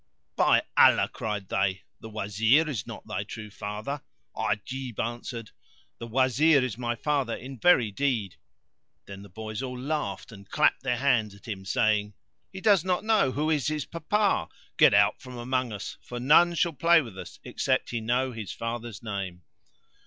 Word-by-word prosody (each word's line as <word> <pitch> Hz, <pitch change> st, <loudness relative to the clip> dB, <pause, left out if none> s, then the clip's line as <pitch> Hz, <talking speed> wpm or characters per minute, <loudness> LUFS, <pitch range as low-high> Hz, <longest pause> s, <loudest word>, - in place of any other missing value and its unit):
"By -, -, +4 dB
Allah," -, -, +6 dB
cried 105 Hz, -3 st, -4 dB
they, 95 Hz, -1 st, 0 dB, 0.2 s
"the 110 Hz, -, -9 dB
Wazir 110 Hz, +8 st, +2 dB
is 120 Hz, -10 st, -4 dB
not 115 Hz, -, -9 dB
thy 100 Hz, -2 st, -3 dB
true 105 Hz, 0 st, -9 dB
father." 105 Hz, +8 st, -5 dB, 0.3 s
Ajib 130 Hz, +2 st, -3 dB
answered, 120 Hz, -1 st, -4 dB, 0.5 s
"The 115 Hz, -, -6 dB
Wazir 130 Hz, +4 st, +3 dB
is 125 Hz, -, -4 dB
my 120 Hz, 0 st, -2 dB
father 140 Hz, -2 st, -1 dB
in 130 Hz, -1 st, -9 dB
very 125 Hz, -8 st, +4 dB
deed." 115 Hz, -6 st, -1 dB, 0.7 s
Then 100 Hz, 0 st, -9 dB
the 100 Hz, -, -12 dB
boys 110 Hz, +4 st, -6 dB
all 125 Hz, -1 st, -5 dB
laughed 135 Hz, -9 st, -3 dB
and 100 Hz, -2 st, -13 dB
clapped -, -, +2 dB
their 125 Hz, -2 st, 0 dB
hands 120 Hz, -6 st, +1 dB
at 100 Hz, -, -17 dB
him, 95 Hz, -3 st, -6 dB
saying 105 Hz, +1 st, +1 dB, 0.4 s
"He 190 Hz, 0 st, -8 dB
does 200 Hz, -5 st, +4 dB
not 185 Hz, +1 st, 0 dB
know 215 Hz, -12 st, +3 dB
who 155 Hz, +3 st, 0 dB
is 150 Hz, -4 st, +1 dB
his 150 Hz, -1 st, -1 dB
papa: 200 Hz, +5 st, 0 dB, 0.3 s
get -, -, +6 dB
out -, -, +3 dB
from 125 Hz, -1 st, -9 dB
among 125 Hz, 0 st, -1 dB
us, 105 Hz, -2 st, -7 dB
for 120 Hz, -, -7 dB
none 165 Hz, +7 st, +5 dB
shall 170 Hz, 0 st, +1 dB
play 165 Hz, +4 st, +5 dB
with 115 Hz, -7 st, -10 dB
us 95 Hz, -, -9 dB
except -, -, -1 dB
he 120 Hz, -2 st, -2 dB
know 125 Hz, +3 st, 0 dB
his 110 Hz, -5 st, -6 dB
father's 115 Hz, -3 st, -5 dB
name." 95 Hz, -5 st, -5 dB
120 Hz, 175 wpm, -27 LUFS, 105-140 Hz, 0.7 s, Allah